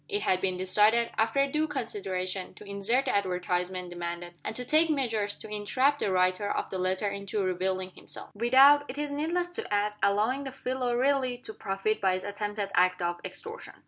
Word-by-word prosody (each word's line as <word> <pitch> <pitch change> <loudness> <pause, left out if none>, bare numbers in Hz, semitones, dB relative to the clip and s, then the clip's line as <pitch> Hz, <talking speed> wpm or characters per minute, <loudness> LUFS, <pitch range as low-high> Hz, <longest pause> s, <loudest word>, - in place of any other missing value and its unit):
It 415 0 -1
had 185 0 +2
been 185 -2 0
decided, 210 +5 +3
after 225 +5 +2
due 305 +3 0
consideration, 195 -9 -3
to - - -12
insert 205 +6 0
the - - 0
advertisement 180 -1 -1
demanded, 175 0 -5
and - - -4
to 250 - -4
take 315 +5 +4
measures 225 -8 0
to - - -9
entrap 255 +7 +1
the 195 - 0
writer 185 +2 +2
of - - -2
the 190 - -3
letter 185 +3 0
into 200 0 -2
revealing 185 0 -1
himself - - -8
without, 265 +6 +6
it 260 - -6
is 295 -1 -2
needless 335 +5 -1
to - - -5
add, 205 0 +1
allowing 215 +7 +2
the 270 - -4
fellow 250 -1 -2
really 260 -1 +1
to 240 -3 -8
profit 195 +1 -2
by 190 -2 +3
his 185 - -4
attempted 205 0 -3
act 180 0 +3
of 175 0 -1
extortion. 455 +2 -8
205 Hz, 190 wpm, -29 LUFS, 185-260 Hz, -, without